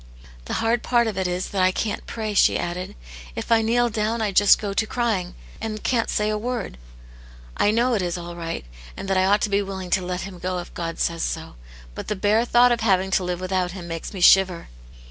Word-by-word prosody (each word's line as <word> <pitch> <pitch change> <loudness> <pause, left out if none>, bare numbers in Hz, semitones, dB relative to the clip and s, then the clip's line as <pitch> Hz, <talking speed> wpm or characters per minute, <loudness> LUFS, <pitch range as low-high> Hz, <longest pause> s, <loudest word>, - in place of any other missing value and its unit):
"The - - -5
hard 225 +1 +1
part 240 -1 +2
of 220 -3 -2
it 190 -1 -1
is 180 +1 -3
that 195 - -1
I 185 0 +4
can't 210 +2 -3
pray," 215 -2 -4
she 200 - +4
added. 175 +1 -4 0.2
" - - -15
If - - -5
I 225 -1 +5
kneel 240 +2 +2
down 220 +1 -1
I 215 -2 0
just 200 +1 +6
go 205 -2 -4
to 220 +2 0
crying, 215 -8 -1 0.3
and 215 -1 -4
can*t 235 -3 +1
say 210 0 0
a 210 - -1
word; 235 - -4 0.8
I - - +3
know 240 +4 +2
it 215 - +1
is 175 0 -2
all 175 0 -7
right, 165 - -5 0.3
and 195 - -6
that 195 - +1
I 185 - +3
ought 205 +2 +3
to 210 - 0
be 200 +1 +3
willing 190 -2 -6
to 190 - +3
let 180 0 -3
him 190 -2 -8
go 185 +1 -2
if 175 - -7
God 165 -1 -4
says 165 -1 -1
so; - - -3 0.4
but - - -7
the 210 - -1
bare 210 +4 +2
thought 245 +1 +5
of 240 - +1
having 190 -4 +2
to 190 - +2
live 180 -1 -3
without 185 -1 -1
him 180 -3 -8
makes 165 -1 -5
me 190 - -7
shiver." 185 -1 +5
195 Hz, 240 wpm, -23 LUFS, 180-220 Hz, 0.8 s, just